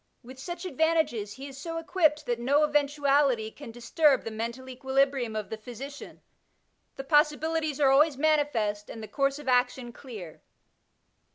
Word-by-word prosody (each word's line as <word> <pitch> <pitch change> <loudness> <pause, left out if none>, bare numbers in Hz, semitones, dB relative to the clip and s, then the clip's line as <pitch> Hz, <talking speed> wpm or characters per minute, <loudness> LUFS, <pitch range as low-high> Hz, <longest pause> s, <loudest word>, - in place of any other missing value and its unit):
With 260 +2 -12
such 345 +5 -6
advantages 315 - 0
he 270 +4 -9
is 270 -1 -10
so 330 +1 -5
equipped 315 -3 +1
that 240 -2 -1
no 280 +5 +3
eventuality 285 -5 +2
can 285 0 -11
disturb 265 +5 +2
the 225 - -5
mental 235 +4 -5
equilibrium 265 -2 0
of 215 -2 -4
the 220 - -5
physician; 265 +6 -9 0.7
the 270 - -6
possibilities 300 +1 +1
are 275 -2 +5
always 290 +1 +4
manifest, 275 -9 +1
and 225 - -8
the - - -7
course 275 +2 0
of 295 -2 -11
action 250 -1 +1
clear. 210 - -10
275 Hz, 155 wpm, -28 LUFS, 240-300 Hz, 0.7 s, are